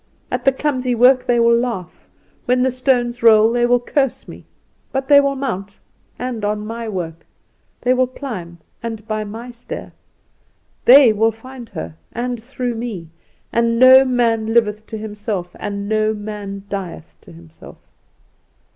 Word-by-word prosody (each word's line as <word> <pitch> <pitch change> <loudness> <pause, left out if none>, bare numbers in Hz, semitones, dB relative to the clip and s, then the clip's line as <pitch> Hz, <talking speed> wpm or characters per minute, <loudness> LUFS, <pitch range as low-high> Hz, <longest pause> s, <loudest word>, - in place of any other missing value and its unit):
At - - -3
the 270 - +6
clumsy 255 -3 -1
work 250 +2 +5
they 240 -1 +3
will 235 0 +5
laugh; 235 -7 -4 0.4
when 250 0 +2
the 260 - +2
stones 245 -1 0
roll 220 -1 +6
they 240 0 +2
will 245 0 +3
curse 270 +1 -1
me. - - -12 0.5
But 270 0 -2
they 285 -1 +7
will 280 0 0
mount, 205 -7 -4 0.4
and 245 -3 -4
on 210 0 -1
my 230 +1 -5
work; 165 -4 -5 0.6
they 250 - +3
will 255 0 +2
climb, 215 -11 -7 0.2
and 225 -2 -6
by 215 -1 -2
my 225 +4 -8
stair! 240 0 -8 0.9
They 255 -3 +8
will 225 +2 +2
find 240 +1 -12
her, 80 0 -7
and 240 0 -4
through 245 0 -4
me! 225 -8 -6 0.4
And 230 0 +2
no 260 +2 +8
man 230 -3 0
liveth 215 -2 +1
to 220 - -6
himself 210 -4 -5
and 200 -1 -4
no 215 0 +1
man 205 -2 -7
dieth 190 -5 -6
to - - -16
himself. 80 -1 -14
230 Hz, 155 wpm, -19 LUFS, 210-250 Hz, 0.9 s, They